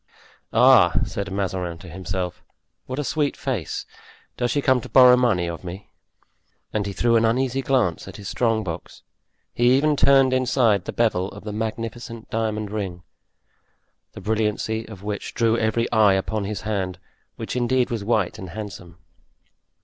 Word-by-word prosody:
"Ah!" - - +6
said 100 -1 -5
Mazarin 95 -3 -2
to 90 +2 -13
himself, 90 0 -4 0.5
"what 130 - -4
a 150 - -1
sweet 145 0 -1
face; 115 - -3 0.5
does 120 -1 -1
she 145 - +1
come 130 -2 +3
to - - -10
borrow 125 -1 +8
money 115 -9 +2
of 85 +1 -6
me?" 95 +4 -8 0.8
And 105 -1 -1
he - - -3
threw 115 +3 +2
an 115 - +2
uneasy 130 +3 +1
glance 130 -11 0
at - - -9
his 100 - -8
strong 115 -1 +1
box; 85 -3 -7 0.5
he 120 +2 +4
even 150 +1 +2
turned 135 -2 +5
inside 125 -6 +2
the - - -4
bevel 100 -5 +1
of - - -11
the 105 0 -5
magnificent 115 +2 -5
diamond 110 -2 -2
ring, 95 -4 -4 1.1
the - - -9
brilliancy 110 +1 -1
of 100 -3 -11
which 105 -1 -5
drew 115 -1 +2
every 115 0 +1
eye 110 -4 +5
upon 100 +2 -1
his 100 -2 -4
hand, 95 -4 -2 0.4
which - - -5
indeed 125 0 +1
was 115 -4 -2
white 105 -4 0
and 95 - -7
handsome. 90 -3 -8
110 Hz, 165 wpm, -23 LUFS, 95-120 Hz, 1.1 s, borrow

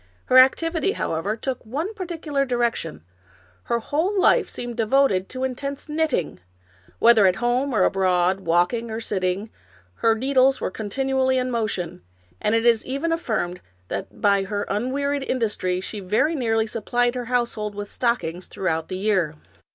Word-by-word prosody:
Her 255 - +7
activity, 330 +8 +3
however, 195 +7 -2
took 260 +2 -4
one 300 - -3
particular 330 -8 -2
direction, 240 - -1 0.3
— 90 -1 -31
her 235 - +2
whole 320 - -1
life - - +4
seemed 240 -1 -5
devoted 225 -4 +2
to 255 0 -5
intense 275 +3 -4
knit 315 +1 0
ting; 165 - -2 0.6
whether 230 -4 +6
at 185 - +3
home 245 +5 0
or 215 -6 +3
abroad, 185 -1 +2
walking 180 +7 +1
or 220 0 -4
sitting, 195 -1 -2 0.5
her 225 - +3
needles 265 +2 +3
were - - -2
continually 260 +5 0
in 255 0 -1
motion, 185 -7 -2 0.4
and 215 +1 +2
it 225 +1 +1
is 230 -2 +4
even 280 +6 -2
affirmed 215 - -2 0.3
that - - -5
by 200 -1 +3
her 205 +1 -2
unwearied 275 +7 -1
industry 210 -8 -1
she 205 +3 -5
very 210 - +1
nearly 225 -6 +1
supplied 240 +2 0
her 250 -1 -4
household 235 -4 -1
with 205 0 -6
stockings 185 -8 -1
throughout 160 -4 -2
the 185 - -4
year. 190 -6 +1
230 Hz, 160 wpm, -23 LUFS, 195-265 Hz, 0.6 s, Her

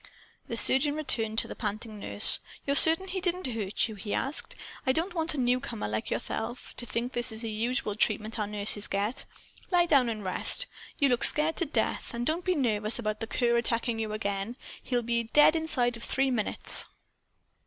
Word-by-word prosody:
The - - -5
surgeon 290 +2 +3
turned 220 -3 -1
to - - +2
the - - -8
panting 215 0 -5
nurse. 205 - +4 0.3
"You're 280 - 0
certain 325 +6 +6
he 375 0 -4
didn't 360 0 0
hurt 225 -5 -2
you?" 220 - -8
he 205 0 -5
asked. 275 +3 -2 0.3
"I 260 - +1
don't 335 +6 -1
want 325 -2 0
a - - -6
newcomer, 250 - -1
like 110 +1 -4
yourself, 225 - -5
to 240 - -5
think 240 +3 -3
this 240 0 0
is 220 0 -5
the 225 - -4
usual 225 0 -2
treatment 215 +1 0
our 210 - -2
nurses 205 0 0
get. 205 +5 -2 0.4
Lie 355 -2 +3
down 275 -7 +3
and 215 -2 -5
rest. 190 - +2 0.3
You 280 -2 +2
look 245 -1 +1
scared 305 +2 +7
to 345 - 0
death. 275 - -2
And 240 +1 -3
don't 330 +5 -1
be 365 0 0
nervous 220 -6 -1
about 215 -2 -3
the 225 - -5
cur 235 0 +1
attacking 235 0 0
you 220 -1 -3
again. 205 +2 -4 0.2
He'll 245 -2 -2
be 235 0 -1
dead 295 +2 +6
inside 260 -7 0
of 230 - -11
three 270 0 0
minutes." 220 -4 +1
235 Hz, 195 wpm, -28 LUFS, 215-280 Hz, 0.4 s, scared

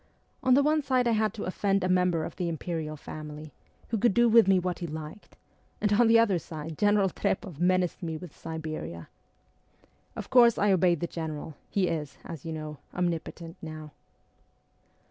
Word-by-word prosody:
' - - -41
On 255 -1 +5
the 280 - +5
one 305 +1 +3
side 260 -3 +1
I - - +3
had 220 -1 +2
to 215 - -5
offend 195 +1 0
a - - +1
member 180 -3 +2
of - - -6
the 175 -2 -2
Imperial 160 -1 -4
Family, 150 0 -8 0.4
who 225 - -1
could 235 -2 +3
do 240 0 +5
with 230 -3 +6
me 195 -1 +5
what 180 0 -2
he 175 - -4
liked, 155 +5 -9 0.4
and 210 -1 +1
on 235 +3 +5
the 230 0 +6
other 210 -6 +3
side 160 -1 -7
General 205 +2 +3
Trpoff 185 -2 -2
menaced 180 0 +1
me 165 -3 -3
with 170 -1 -11
Siberia! 155 - -6 1.1
Of - - -7
course 235 -2 +6
I 205 0 +3
obeyed 180 -3 +3
the - - +1
General; 160 -2 -5
he 195 -3 +1
is, 155 -4 -3
as 160 -5 -8
you 165 - -4
know, 155 -2 -6 0.2
omnipotent 170 -1 -3
now.' 155 -1 -8
175 Hz, 185 wpm, -28 LUFS, 160-205 Hz, 1.1 s, with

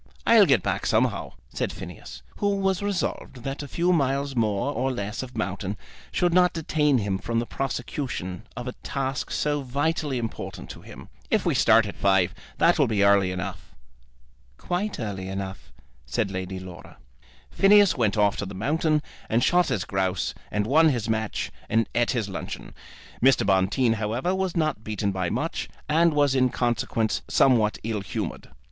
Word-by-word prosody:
"I'll - - +7
get - - +4
back - - -1
somehow," - - +1 0.2
said - - -2
Phineas, - - -9
who 205 -1 +1
was 195 -1 0
resolved 185 -10 -3
that 135 +2 -4
a 145 - -6
few 175 +5 +1
miles 140 -2 0
more 115 +4 0
or 130 +1 0
less 105 -2 -4
of 125 -2 -8
mountain 100 0 -3 0.3
should 175 -1 +1
not 180 0 +4
detain 150 -3 +1
him 100 -4 -1
from 115 +3 -2
the 115 - +1
prosecution 120 -7 -4
of 125 +1 -5
a - - -2
task 135 -1 -3
so 145 -1 0
vitally 145 +1 -1
important 115 -2 -5
to - - -11
him. - - -12 0.2
"If - - +1
we - - +2
start 115 -1 +5
at 100 - -6
five 95 -3 +2 0.2
that - - +4
will - - +4
be 105 -2 +1
early 100 -2 +4
enough." 95 0 -6 0.8
"Quite 195 +4 -2
early 100 -5 -4
enough," 95 0 -6 0.4
said 100 - -1
Lady 95 0 -4
Laura. 90 -2 -11 0.5
Phineas 205 -1 +5
went 110 -5 +1
off 105 -1 +3
to 100 - -3
the 100 - -8
mountains, 150 - +1 0.3
and 115 +2 +2
shot 180 +4 +4
his 95 - -1
grouse, 95 -2 -1 0.2
and 105 0 -1
won 155 +7 +5
his 120 -5 -1
match, 110 -1 -2 0.2
and 115 -1 +2
eat 120 0 +2
his 115 -5 0
luncheon. 95 - -6 0.5
Mr. 135 -3 +4
Bonteen, 100 +5 +3
however, 115 - -1
was 190 -2 -1
not 155 -9 0
beaten 105 -2 -2
by 95 -2 -1
much, - - -3 0.2
and 165 +1 +3
was 145 -2 +3
in 130 -1 +3
consequence 120 -2 0
somewhat 115 -5 +3
ill 110 -2 -2
humoured. 95 - -5
120 Hz, 170 wpm, -25 LUFS, 100-145 Hz, 0.8 s, I'll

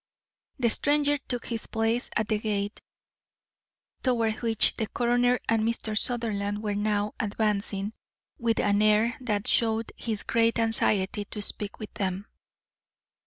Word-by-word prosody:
The 235 -3 +2
stranger 290 +2 +2
took 245 -2 -5
his 230 -2 -3
place 225 +1 -1
at 220 - +1
the 215 0 0
gate, 205 -1 -2 1.2
toward 230 -4 +1
which 225 -3 +2
the 220 - -2
coroner 245 +2 +2
and 225 -1 +2
Mr. 220 -1 -1
Sutherland 210 -3 0
were 210 -1 -1
now 205 0 0
advancing, 205 -1 -1 0.5
with 230 -1 +1
an 205 0 +2
air 215 +2 +3
that 210 -5 -1
showed 225 -1 +1
his 220 -3 -3
great 230 0 +2
anxiety 210 -3 +3
to 210 - -8
speak 205 0 -4
with 215 - -8
them. 195 -2 -3
220 Hz, 135 wpm, -27 LUFS, 205-230 Hz, 1.2 s, air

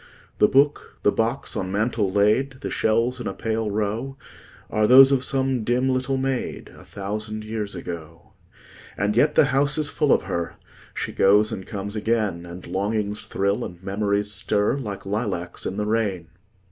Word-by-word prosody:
The 105 - +6
book, 140 +4 +1
the 105 - +4
box 115 +6 -1
on 95 0 -3
mantel 105 -1 0
laid, 115 +7 +2
The - - -4
shells 115 +3 +1
in - - -4
a 95 - -4
pale 110 -1 -2
row, 110 +6 -2 0.5
Are 105 0 +2
those 135 +3 +9
of 135 -2 +2
some 130 -3 0
dim 125 +3 +1
little 130 +1 0
maid, 135 -1 -3
A - - -13
thousand 105 +2 -5
years 110 -2 -4
ago. 85 -1 -8 0.6
And 105 +2 0
yet 150 +5 +3
the - - +6
house 140 +2 +3
is 150 -2 0
full 150 0 +1
of - - +4
her; 85 -3 -3 0.4
She - - -3
goes 105 +2 +4
and 95 - -6
comes 100 +1 -5
again; 105 -6 -1
And 85 +1 -9
longings 105 +3 -2
thrill, 100 +1 0
and 90 +1 -8
memories 100 +1 0
stir, 105 +2 +1
Like 105 -8 -6
lilacs 100 -4 -3
in 95 - -4
the 105 - -1
rain. 105 -6 -1
105 Hz, 170 wpm, -23 LUFS, 100-125 Hz, 0.6 s, those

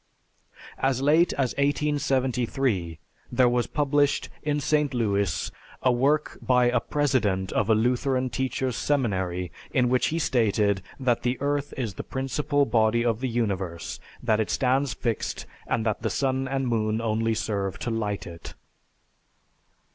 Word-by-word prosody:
As 130 -1 +1
late 155 +5 +4
as 130 -3 0
1873 130 - 0 0.3
there 130 -1 +4
was 120 0 +1
published, 145 -1 +1
in 150 -1 0
St. 150 -1 +1
Louis, 100 -6 0 0.3
a 130 - +5
work 140 +5 +1
by 125 -1 +3
a 125 - +3
president 115 -10 0
of 105 - 0
a 110 - +6
Lutheran 125 +3 +1
teachers' 130 -1 -1
seminary 95 - -1 0.2
in 125 -2 +2
which 125 0 +2
he 160 - -1
stated 105 - +2 0.2
that 125 -3 +1
the 125 +2 -1
earth 145 0 -1
is 115 -6 -2
the - - -6
principal 140 +2 0
body 115 -1 +2
of 115 -2 +1
the 130 0 -2
universe, 95 -8 -2 0.2
that 110 -3 +2
it 110 - 0
stands 130 +1 +1
fixed, 115 -3 -2 0.2
and 115 -1 0
that 110 -2 -1
the - - 0
sun 130 -1 0
and 135 0 -1
moon 110 -2 0
only 115 0 0
serve 100 -3 -2
to 120 - -3
light 105 -3 -2
it. 85 -2 -9
125 Hz, 145 wpm, -26 LUFS, 110-135 Hz, 0.3 s, a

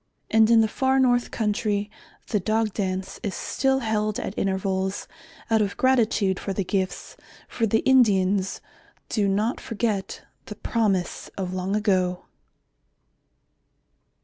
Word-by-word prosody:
And 220 0 +5
in 230 -1 +6
the 220 - +3
far 265 +4 +1
north 245 -2 +3
country, 210 -1 -1 0.4
the 210 - +1
Dog 215 +2 0
Dance 190 -2 -3
is 200 - -3
still 270 0 0
held 215 -2 -1
at - - -4
intervals 190 0 -1 0.4
out 220 -1 +4
of 200 -1 -2
gratitude 225 -7 +2
for 195 - -3
the 195 - -1
gifts, 190 0 -3 0.3
for 225 - -1
the 220 +2 +2
Indians 200 -7 +3 0.5
do 205 -3 +1
not 210 +5 0
forget 220 -4 -3 0.2
the - - -7
promise 200 -6 -1
of 185 -2 -3
long 185 +2 -2
ago. 185 -4 +1
210 Hz, 130 wpm, -24 LUFS, 190-225 Hz, 0.5 s, in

